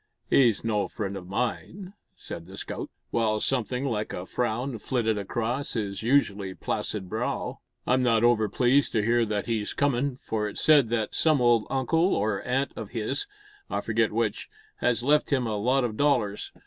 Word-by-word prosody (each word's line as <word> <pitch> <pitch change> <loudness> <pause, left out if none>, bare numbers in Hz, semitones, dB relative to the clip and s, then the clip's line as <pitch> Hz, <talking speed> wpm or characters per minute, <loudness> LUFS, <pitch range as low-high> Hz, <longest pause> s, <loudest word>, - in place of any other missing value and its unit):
"He's 120 -6 +4
no 105 -3 0
friend 100 -2 -4
o' 95 - -5
mine," 125 - -4 0.2
said 85 - -8
the - - -11
scout, - - -5 0.2
while 110 -2 +1
something 125 +2 -1
like 110 -5 -2
a 90 - -5
frown 120 +3 -2
flitted 115 -2 0
across 120 +7 -2
his 100 -4 -3
usually 105 -6 +1
placid 100 -4 -3
brow. 110 +5 -3 0.3
"I'm 130 +1 +3
not 115 -2 +3
over 115 -3 +4
pleased 130 +6 +2
to 110 - +2
hear 115 0 +3
that 105 -1 -1
he's 110 -3 -2
comin', 140 -1 +1
for 105 -1 -2
it's - - -6
said 145 -7 +5
that 110 -2 -1
some 155 -3 +3
old 120 -3 +3
uncle 160 +8 +2
or 105 -1 0
aunt 135 +3 -1
o' 110 - -5
his 115 - -2 0.4
I - - -1
forget - - +1
which - - -1 0.3
has 120 -1 +1
left 150 +3 +3
him 130 -3 +2
a 110 -2 -1
lot 125 +6 +2
o' 120 - 0
dollars. 110 -5 0
115 Hz, 175 wpm, -27 LUFS, 105-130 Hz, 0.4 s, said